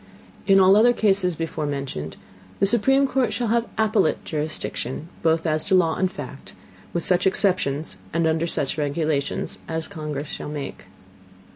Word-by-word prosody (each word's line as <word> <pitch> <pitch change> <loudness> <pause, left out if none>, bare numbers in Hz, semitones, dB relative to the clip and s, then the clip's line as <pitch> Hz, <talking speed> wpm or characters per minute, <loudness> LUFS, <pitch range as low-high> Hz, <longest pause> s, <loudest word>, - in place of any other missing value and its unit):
In 195 -1 +6
all 190 0 +6
the 205 - +6
other 245 +2 +5
Cases 195 -6 +1
before 160 -1 -3
mentioned, 135 - -4 0.4
the - - +4
supreme 270 +6 +4
Court 260 -4 +1
shall 225 +2 -2
have 235 +1 +1
appellate 215 -6 +1
Jurisdiction, 155 -1 -4
both 165 0 +2
as 155 -1 +2
to 195 -2 +3
Law 165 -3 +3
and 185 0 0
Fact, 140 -4 -9 0.4
with 170 - -1
such 180 +1 +3
Exceptions, 180 -7 0
and 165 0 +1
under 160 +1 +1
such 150 -2 -1
Regulations 145 -1 -1
as 160 0 -3
the - - -14
Congress 150 -3 -4
shall - - -6
make. 145 -8 -6
165 Hz, 165 wpm, -23 LUFS, 150-195 Hz, 0.4 s, In